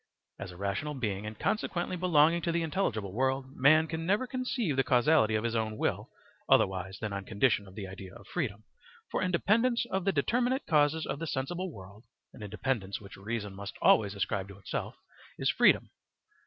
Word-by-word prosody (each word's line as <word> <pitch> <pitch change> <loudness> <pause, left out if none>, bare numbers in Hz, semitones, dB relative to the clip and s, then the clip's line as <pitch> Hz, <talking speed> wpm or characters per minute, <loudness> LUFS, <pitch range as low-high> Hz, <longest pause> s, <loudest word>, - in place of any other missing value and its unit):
As 100 - -6
a 90 - -12
rational 100 +10 -2
being, 105 -5 -3
and 110 0 -7
consequently 185 - -1
belonging 170 -2 +4
to 170 - 0
the 170 0 0
intelligible 120 - -1
world, 130 +2 -1
man 155 +4 +5
can 160 0 -4
never 205 +8 +1
conceive 250 - -2
the 135 - +3
causality 125 -2 +3
of 110 - 0
his 115 0 -1
own 110 -1 -1
will - - -1 0.4
otherwise 95 0 +2
than 110 -2 -4
on 100 0 -4
condition 100 0 +1
of 95 - -14
the 105 -3 -5
idea 95 -1 -9
of 100 - -13
freedom, 110 - -3 0.5
for - - -1
independence 220 +7 +2
of 190 -1 0
the 195 - +3
determinate 245 - +1
causes 155 0 +2
of 140 - -4
the 165 - -4
sensible 175 +7 -3
world 100 -1 -12 0.3
(an - - -13
independence 105 -1 -2
which 100 -1 -12
reason 105 0 -4
must 100 +1 -7
always 100 -2 +4
ascribe 100 -1 -2
to 100 -1 -12
itself) 100 - -5 0.4
is - - +2
freedom. - - +4
130 Hz, 185 wpm, -30 LUFS, 100-165 Hz, 0.5 s, man